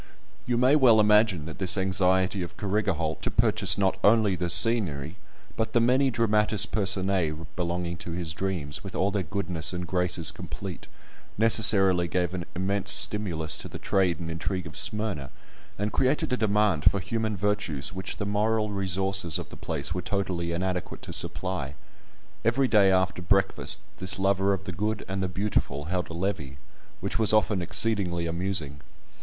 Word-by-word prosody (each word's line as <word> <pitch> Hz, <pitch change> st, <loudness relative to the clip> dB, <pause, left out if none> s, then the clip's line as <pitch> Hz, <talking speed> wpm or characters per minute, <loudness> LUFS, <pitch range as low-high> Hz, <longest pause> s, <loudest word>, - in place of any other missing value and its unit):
You 120 Hz, -1 st, +1 dB
may 130 Hz, +4 st, +4 dB
well 125 Hz, -7 st, +5 dB
imagine 105 Hz, -6 st, +3 dB
that 80 Hz, -, -9 dB
this 95 Hz, 0 st, +2 dB
anxiety 95 Hz, 0 st, +1 dB
of 85 Hz, -, -7 dB
Carrigaholt 95 Hz, -6 st, -1 dB
to -, -, -1 dB
purchase 100 Hz, -, +3 dB
not 95 Hz, -1 st, 0 dB
only 105 Hz, -2 st, +4 dB
the 90 Hz, -1 st, -3 dB
scenery, 85 Hz, -, +2 dB, 0.4 s
but 110 Hz, 0 st, -2 dB
the 120 Hz, -, +4 dB
many 130 Hz, +4 st, +3 dB
dramatis 110 Hz, -3 st, +2 dB
personæ 95 Hz, -6 st, 0 dB
belonging 85 Hz, -1 st, -3 dB
to 85 Hz, -, -8 dB
his 85 Hz, -2 st, -4 dB
dreams, 85 Hz, -6 st, -4 dB
with -, -, -8 dB
all 100 Hz, +2 st, +1 dB
their 100 Hz, 0 st, -1 dB
goodness 90 Hz, -4 st, -1 dB
and 90 Hz, 0 st, -4 dB
graces 90 Hz, -3 st, 0 dB
complete, 95 Hz, -5 st, -8 dB, 0.5 s
necessarily 95 Hz, -5 st, +5 dB
gave 90 Hz, 0 st, -1 dB
an 90 Hz, -2 st, -4 dB
immense 100 Hz, +2 st, -1 dB
stimulus 85 Hz, -7 st, +1 dB
to -, -, -6 dB
the -, -, -8 dB
trade 95 Hz, -3 st, 0 dB
and 85 Hz, -1 st, -5 dB
intrigue 90 Hz, +2 st, -3 dB
of 80 Hz, -, -9 dB
Smyrna, 105 Hz, -, 0 dB, 0.5 s
and 105 Hz, +1 st, -2 dB
created 130 Hz, 0 st, +1 dB
a -, -, +1 dB
demand 105 Hz, -7 st, +1 dB
for 100 Hz, -, -2 dB
human 110 Hz, +2 st, -3 dB
virtues 100 Hz, -8 st, -1 dB
which 95 Hz, +1 st, -4 dB
the 100 Hz, -, -3 dB
moral 105 Hz, +1 st, 0 dB
resources 95 Hz, -3 st, 0 dB
of -, -, -7 dB
the -, -, -11 dB
place 70 Hz, +3 st, -3 dB
were 90 Hz, -, -3 dB
totally 90 Hz, -3 st, -2 dB
inadequate 90 Hz, +1 st, -3 dB
to -, -, -7 dB
supply. 70 Hz, +1 st, -3 dB, 0.7 s
Every 130 Hz, +4 st, +2 dB
day 105 Hz, -5 st, +4 dB
after 95 Hz, -1 st, +1 dB
breakfast 95 Hz, +3 st, +1 dB, 0.2 s
this 95 Hz, -, +3 dB
lover 95 Hz, 0 st, +1 dB
of 95 Hz, -4 st, -2 dB
the -, -, -5 dB
good 105 Hz, +4 st, -3 dB
and 95 Hz, 0 st, -3 dB
the 95 Hz, -, -1 dB
beautiful 90 Hz, -7 st, -2 dB
held 90 Hz, -1 st, -2 dB
a -, -, -7 dB
levee, 80 Hz, -7 st, -4 dB, 0.4 s
which -, -, -3 dB
was 110 Hz, -1 st, +3 dB
often 105 Hz, -3 st, +2 dB
exceedingly 90 Hz, -2 st, +1 dB
amusing. 85 Hz, -4 st, -3 dB
95 Hz, 170 wpm, -26 LUFS, 85-105 Hz, 0.7 s, well